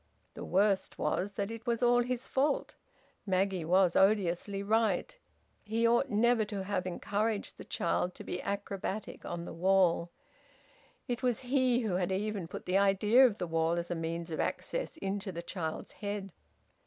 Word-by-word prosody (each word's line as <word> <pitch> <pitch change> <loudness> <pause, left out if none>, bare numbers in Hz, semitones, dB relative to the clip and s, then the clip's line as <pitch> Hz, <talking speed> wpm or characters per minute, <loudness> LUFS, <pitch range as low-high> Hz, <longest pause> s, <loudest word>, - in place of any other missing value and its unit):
The - - -7
worst 195 +1 +1
was 200 +3 -1
that 200 +2 -3
it 230 +2 -8
was 235 +1 0
all 245 0 +5
his 250 0 -2
fault. 275 +2 0 0.5
Maggie 190 -1 +1
was 180 +1 +3
odiously 195 0 +2
right. 215 - +1 0.5
He 225 +2 +1
ought 240 +4 +3
never 235 +1 +3
to 205 -2 -4
have 190 -1 -2
encouraged 205 +4 -2
the - - -7
child 175 +1 -1
to - - -9
be 180 - -4
acrobatic 200 +1 -4
on 170 0 -4
the - - -7
wall. 175 -1 +3 1.0
It 245 -1 -2
was 250 -3 0
he 255 -1 +2
who 205 -6 0
had 185 0 -1
even 200 -2 -2
put - - -8
the 185 +2 +2
idea 210 +6 +5
of 215 -4 -4
the - - -2
wall 165 0 +1
as 170 0 -2
a - - 0
means 165 +1 -4
of 155 - -3
access - - -2
into 195 -5 -3
the 170 -1 -6
child's 160 -3 -4
head. 200 -2 -5
200 Hz, 170 wpm, -31 LUFS, 180-225 Hz, 1.0 s, all